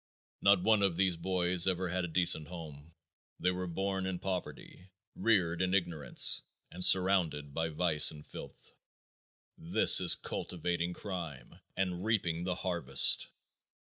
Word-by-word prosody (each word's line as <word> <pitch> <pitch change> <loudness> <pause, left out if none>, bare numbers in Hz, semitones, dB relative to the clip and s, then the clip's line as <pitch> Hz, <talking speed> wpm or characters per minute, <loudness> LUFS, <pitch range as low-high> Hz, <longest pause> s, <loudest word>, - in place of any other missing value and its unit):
Not 100 -2 +2
one 110 0 +2
of 95 -4 -1
these 95 -2 0
boys 90 +1 -1
ever 95 0 -2
had 90 +1 -3
a - - -4
decent 80 -2 +2
home. 80 -2 -12 0.4
They 90 +2 0
were 90 0 -6
born 95 +2 -4
in 95 -1 -5
poverty, 90 0 -8 0.3
reared 90 -7 -1
in 95 +1 -1
ignorance, 85 -5 0 0.3
and 90 +1 -1
surrounded 90 -7 +3
by 80 +1 -3
vice 80 -1 +2
and 75 -1 -9
filth. - - -13 0.9
This - - +5
is - - +6
cultivating 85 0 -5
crime 85 -8 -9 0.2
and 90 -1 -3
reaping 90 -6 -2
the 90 -1 -3
harvest. 90 -2 +3
90 Hz, 140 wpm, -30 LUFS, 85-95 Hz, 0.9 s, is